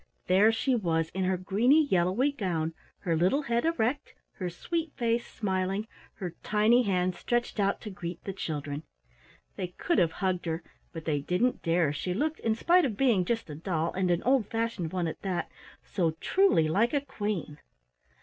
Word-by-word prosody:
There 195 +5 +5
she 255 +4 0
was 165 -8 +1
in 190 +1 -2
her 185 0 +1
greeny 235 - +3
yellowy 190 +6 +2
gown, 170 - -2 0.3
her 170 -2 0
little 185 - +2
head 235 -1 0
erect, 285 -4 0 0.2
her 180 -2 -2
sweet 325 - -3
face 235 -1 0
smiling, 195 +1 -2 0.3
her 180 -4 -5
tiny 215 +4 +4
hands 185 -4 0
stretched 240 -2 -1
out 200 0 +1
to 210 - -6
greet 175 -2 -6
the 195 - -4
children. 150 -5 -4 0.8
They 180 - -2
could 340 - +1
have 165 -2 +2
hugged 185 -2 -1
her, 165 +1 -2 0.3
but 165 -3 -8
they 150 -3 +1
didn't 180 - 0
dare, 165 -3 +2
she 180 +5 -3
looked, 305 +7 -1
in 225 -1 +1
spite 350 +9 +4
of 225 -9 -1
being 235 -9 +3
just 230 +3 -1
a 150 - -7
doll 165 +1 -2
and 185 -1 0
an 175 -1 +1
old 255 -4 +3
fashioned 225 -8 -2
one 180 -2 -1
at 160 - -4
that, 185 -3 -2 0.3
so 170 -5 -1
truly 380 - +3
like 220 - +2
a 285 - +2
Queen. 205 - -4
190 Hz, 180 wpm, -29 LUFS, 175-235 Hz, 0.8 s, There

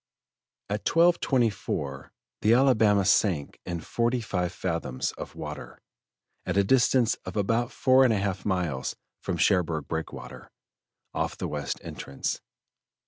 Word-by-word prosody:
At 105 +1 -3
12.24 120 - +1 0.3
the 110 +3 +5
Alabama 110 -7 +4
sank 90 -7 +2
in 85 -2 -3
forty 120 +6 0
five 90 -6 -2
fathoms 85 -8 -2
of - - -9
water, - - -7 0.6
at - - -2
a 100 - +5
distance 125 +1 +3
of - - -6
about 115 +5 +1
four 130 0 +4
and 125 - +4
a 110 - +2
half 100 -1 -2
miles 85 -9 -1 0.2
from - - -3
Cherbourg 80 -5 +2
Breakwater, 80 0 -6 0.6
off - - -2
the - - -3
west 75 -2 -3
entrance. 70 -1 -4
100 Hz, 130 wpm, -27 LUFS, 85-120 Hz, 0.6 s, the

